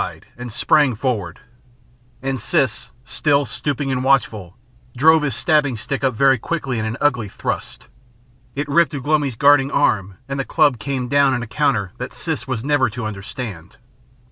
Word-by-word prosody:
"Wau!" - - 0
he - - -16
cried, - - -23
and 120 0 -8
sprang 130 +3 +3
forward, 105 -8 -3 0.8
and 135 -1 -2
Siss, 130 -3 0 0.2
still 145 +3 +1
stooping 135 +3 -3
and 130 -1 -1
watchful, 110 -9 0 0.4
drove 160 +4 +5
his 135 -6 -1
stabbing 145 -4 +1
stick 135 +5 -4
up 130 -3 +1
very 135 +1 +4
quickly 135 -4 -3
in 110 - -2
an 110 +2 -3
ugly 125 -8 +1
thrust. - - -5 0.7
It 145 +2 -2
ripped 150 0 +2
Ugh 135 - -6
lomi's 145 -4 +1
guarding 140 +2 +4
arm 100 -10 +1
and 135 0 -4
the - - 0
club 145 -5 +2
came 130 +1 -3
down 140 0 +3
in 120 - -3
a - - -7
counter 125 -6 0
that 125 - -5
Siss 160 -4 -4
was 125 -4 -3
never 140 -4 +2
to 110 +1 -6
understand. 100 -2 -7
130 Hz, 180 wpm, -20 LUFS, 115-145 Hz, 0.8 s, drove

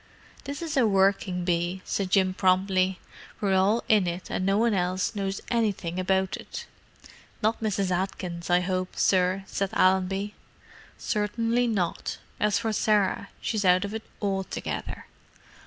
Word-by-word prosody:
"This 285 +4 -5
is 320 -3 -3
a 255 -5 +4
working 190 -2 +2
bee," 175 +1 -1
said 195 -2 -1
Jim 185 -1 +3
promptly. 185 0 +2 0.4
"We're 200 -2 +1
all 195 +5 +3
in 210 -4 +4
it, 175 +1 -4
and - - -1
no 195 +1 +2
one 230 0 +3
else 185 +1 0
knows 195 -2 -3
anything 200 -7 0
about 190 0 +1
it." - - -8 0.8
"Not 220 +2 +1
Mrs. 200 -3 0
Atkins, 180 -2 -3
I 175 0 +4
hope, 185 0 -2
sir," 185 0 +2
said 195 0 -2
Allenby. 190 +2 +2 0.6
"Certainly 230 +3 0
not. 190 -7 -1 0.2
As 210 -1 +2
for 220 -1 -1
Sarah, 205 -2 +1
she's 215 -2 -1
out 185 +1 +4
of 200 - -6
it 220 - -3 0.2
altogether." 195 -2 -3
195 Hz, 145 wpm, -27 LUFS, 185-210 Hz, 0.8 s, a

